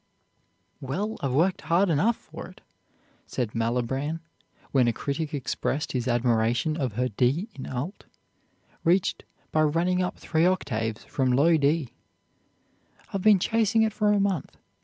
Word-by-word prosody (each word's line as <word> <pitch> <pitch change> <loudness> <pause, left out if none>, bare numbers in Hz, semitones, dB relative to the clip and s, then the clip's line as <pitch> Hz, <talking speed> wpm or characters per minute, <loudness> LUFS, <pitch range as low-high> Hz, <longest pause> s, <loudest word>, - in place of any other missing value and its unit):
"Well, 195 +12 -3
I've 135 -3 -1
worked 175 +7 +2
hard 170 +4 +2
enough 205 +10 +3
for - - -10
it," - - -16 0.7
said 120 -4 -3
Malibran 125 +7 -1 0.5
when 130 -3 +4
a 120 - +2
critic 145 +4 -3
expressed 145 0 -2
his 125 -2 -2
admiration 120 +4 +1
of 130 -8 -2
her 125 +4 0
D 130 - +1
in 130 - -8
alt, 135 - -5 0.8
reached 180 +2 +2 0.3
by 155 - +2
running 170 +4 +2
up 180 - -2
three 165 +1 +1
octaves 115 -12 -1
from 130 -2 0
low 150 +7 +4
D; 150 -2 +1 1.2
"I've 195 - -1
been 210 0 +6
chasing 225 +3 +2
it 220 -1 0
for 210 -1 +2
a 205 - +3
month. 195 -6 -1
150 Hz, 145 wpm, -26 LUFS, 125-185 Hz, 1.2 s, been